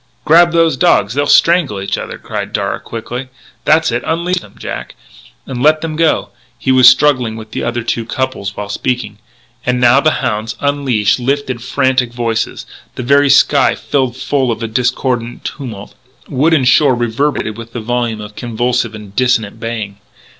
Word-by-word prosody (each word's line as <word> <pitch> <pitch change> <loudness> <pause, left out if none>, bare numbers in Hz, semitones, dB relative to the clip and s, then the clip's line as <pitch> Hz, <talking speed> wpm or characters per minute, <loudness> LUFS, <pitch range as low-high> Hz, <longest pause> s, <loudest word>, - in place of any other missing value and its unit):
"Grab 170 +2 +6
those 165 -4 +2
dogs! 100 -3 +3
They'll 145 +2 0
strangle 165 - +3
each 100 - -2
other," - - -6
cried - - -6
Darragh - - -2
quickly. 120 +3 -6 0.4
"That's 155 -3 +3
it 120 +1 -1
unleash 170 +3 -1
them, - - -16
Jack, - - -6 0.5
and 125 -2 -5
let 155 +2 +4
them 160 -1 -4
go!" 160 0 +1 0.3
he 130 - 0
was 130 -1 +8
struggling 130 -5 +2
with 110 -1 -10
the - - -4
other 120 0 -2
two 115 0 -2
couples 115 -5 -3
while 105 - -4
speaking. 110 0 -3 0.4
And 125 0 0
now 125 +2 +5
the 155 +2 +1
hounds, 110 +1 -2
unleashed, 135 -7 +1
lifted 130 -1 -2
frantic 130 -1 0
voices. 115 -2 -2 0.3
The 125 - -4
very 140 +3 +4
sky 140 0 +4
seemed 130 -4 -1
full 130 -2 0
of 115 - -3
the 115 - -3
discordant 120 0 -2
tumult; 115 -8 -7 0.3
wood 150 +4 +2
and 130 -5 +2
shore 135 -1 +4
reverberated 120 -1 -1
with 115 0 -10
the 120 - -4
volume 115 -1 -2
of 105 0 -10
convulsive 120 -1 -1
and 105 -2 -11
dissonant 115 -4 +1
baying. 110 -3 -5
125 Hz, 170 wpm, -15 LUFS, 115-140 Hz, 0.5 s, was